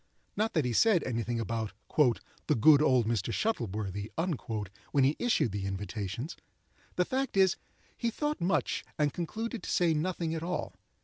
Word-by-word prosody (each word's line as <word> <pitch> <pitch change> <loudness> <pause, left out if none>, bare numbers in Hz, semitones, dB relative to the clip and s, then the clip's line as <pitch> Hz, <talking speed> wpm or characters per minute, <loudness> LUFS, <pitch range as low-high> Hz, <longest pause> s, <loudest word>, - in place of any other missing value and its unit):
Not 220 +2 0
that 155 -6 +2
he 125 - 0
said 190 - +4
any 115 -2 -1
thing 115 +1 -2
about 110 -2 -2 0.7
"the - - +3
good 145 +6 +7
old 130 -6 +4
Mr. 115 -1 0
Shuttleworthy" 105 - -2 0.8
when 140 - +4
he 140 +3 +3
issued 165 - +2
the 100 0 -3
invitations. 100 - -4 0.6
The 180 - +2
fact 265 -2 -1
is, 190 -1 +5 0.4
he 235 - -1
thought 295 +6 -2
much 180 +3 +1
and 150 -2 +1
concluded 225 +7 -4
to - - -7
say 170 -2 +3
nothing 165 +1 -1
at 160 - -3
all. 180 +2 -3
150 Hz, 165 wpm, -30 LUFS, 115-185 Hz, 0.8 s, good